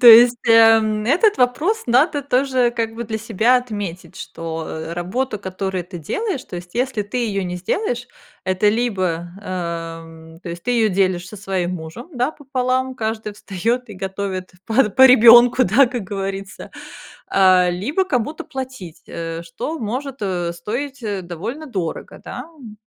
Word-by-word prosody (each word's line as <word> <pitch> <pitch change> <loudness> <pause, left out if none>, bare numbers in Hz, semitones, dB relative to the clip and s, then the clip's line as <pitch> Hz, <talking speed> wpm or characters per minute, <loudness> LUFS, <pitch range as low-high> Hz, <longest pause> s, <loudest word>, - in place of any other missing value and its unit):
То 245 - +5
есть, 235 +1 +9
эм, 225 -1 +5
этот 360 - +3
вопрос 300 - +1
надо 285 +5 +3
тоже 260 -2 +2
как 230 -1 -3
бы 235 +1 -5
для 220 0 -3
себя 225 +3 +2
отметить, 195 -7 -5
что, 165 -1 -6
э, 160 +1 -6
работа, 210 +8 -2
которую 190 -1 -4
ты 175 0 -9
делаешь, 330 - -3
то 180 - -8
есть, 175 0 -10
если 250 -3 0
ты 205 +5 -4
её 205 -5 -1
не 180 -1 -4
сделаешь, 245 - -2 0.4
это 190 +2 +2
либо, 185 -7 -1
эм, 165 -3 -6
то 185 - -8
есть, 170 0 -7
ты 245 - -2
её 230 -3 +3
делишь 185 -2 0
со 210 - -10
своим 185 -2 -2
мужем, 165 - -8
да, 250 +4 0
пополам, 260 -2 -1
каждый 220 -3 -3
встаёт 225 +5 -2
и - - -8
готовит 190 0 -4
по 225 +1 +3
по 260 +6 +5
ребёнку, 240 0 +8
да, 245 +8 +5
как 245 -2 -4
говорится, 195 0 -5 0.6
а, 185 -2 +5
либо 220 - -1
кому-то 295 -2 -2
платить, 260 - -7
э, 165 0 -5
что 170 - -5
может, 255 +3 -4
э, 175 -3 -1
стоить, 250 +9 -5
э, 205 -3 -2
довольно 210 - -6
дорого, 185 - -5
да, 250 - -6
м. 220 -6 -12
215 Hz, 160 wpm, -20 LUFS, 185-250 Hz, 0.6 s, есть